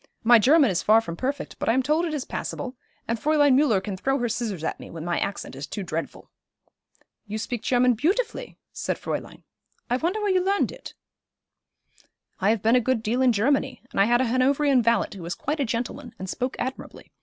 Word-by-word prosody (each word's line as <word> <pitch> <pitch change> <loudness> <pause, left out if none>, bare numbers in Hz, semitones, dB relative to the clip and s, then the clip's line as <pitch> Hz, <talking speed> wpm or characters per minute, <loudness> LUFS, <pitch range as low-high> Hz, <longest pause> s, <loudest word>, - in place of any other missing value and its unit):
My 235 0 +7
German 275 +1 +5
is 180 0 0
far 220 +1 +5
from 170 -7 -6
perfect, 275 +8 -4
but - - -1
I - - +4
am 260 +2 +2
told 310 +5 +1
it 325 - -3
is 275 - -3
passable, 260 -1 -5 0.3
and 230 0 -1
Fräulein 290 +1 +4
Müller 255 -8 +3
can 205 -3 -4
throw 270 +9 0
her 240 -2 -1
scissors 210 -8 -3
at - - -3
me - - -10
when 165 -1 -7
my 175 0 0
accent 200 - -4
is 135 +1 -6
too 200 - -5
dreadful.' 165 -2 -5 1.0
'You 210 +1 -4
speak 230 +1 -4
German 250 0 +3
beautifully,' 415 - -1 0.2
said - - -2
Fräulein. - - -5 0.5
'I 245 - +3
wonder 345 +9 -1
where 415 -2 0
you 370 -1 +2
learned 395 +1 +1
it?' - - -11 1.4
'I 195 - +2
have 220 -2 +1
been 225 +2 +4
a 250 - +4
good 250 -2 0
deal 235 +4 0
in 255 -1 +5
Germany, 265 +4 0
and - - +1
I - - +6
had 240 +3 +3
a - - +2
Hanoverian 265 +2 +3
valet 230 -1 +2
who 195 - -9
was 170 +1 -4
quite 300 +3 -3
a 280 - +1
gentleman, 240 +2 -4
and 190 - -6
spoke 250 +7 -3
admirably. 260 +1 -6
245 Hz, 215 wpm, -25 LUFS, 215-280 Hz, 1.4 s, My